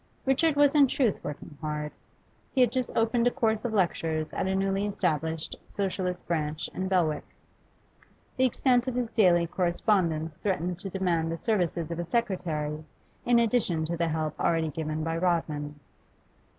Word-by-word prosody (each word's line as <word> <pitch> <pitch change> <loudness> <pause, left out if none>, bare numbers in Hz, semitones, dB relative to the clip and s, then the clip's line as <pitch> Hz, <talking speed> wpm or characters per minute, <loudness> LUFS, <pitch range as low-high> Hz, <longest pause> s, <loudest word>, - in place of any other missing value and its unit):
Richard 285 +4 +3
was 285 -1 +5
in 290 -2 +6
truth 250 -6 0
working 150 +1 -7
hard. 150 -1 -3 0.6
He 260 - +4
had 245 -3 +5
just 255 -1 -1
opened 230 +1 +2
a - - +6
course 220 -1 0
of 240 - -1
lectures 165 -5 0
at - - -1
a 190 - 0
newly 195 +1 0
established 160 -5 -1
Socialist 185 -2 -2
branch 155 -2 -2
in 190 - -2
Belwick. 175 -5 +1 1.1
The 260 - +3
extent 250 0 +2
of 255 - -2
his 245 -2 -1
daily 175 -5 +4
correspondence 170 -3 0
threatened 180 -3 -1
to 195 - -6
demand 175 -4 0
the 165 - -3
services 175 -6 -1
of 170 - -3
a - - -1
secretary 160 -7 -1 0.4
in 240 0 +4
addition 215 -9 +2
to 170 +2 -2
the 170 0 0
help 155 -1 -2
already 165 -1 +1
given 155 +1 -3
by 165 +1 -1
Rodman. 155 -4 -1
180 Hz, 165 wpm, -28 LUFS, 160-220 Hz, 1.1 s, in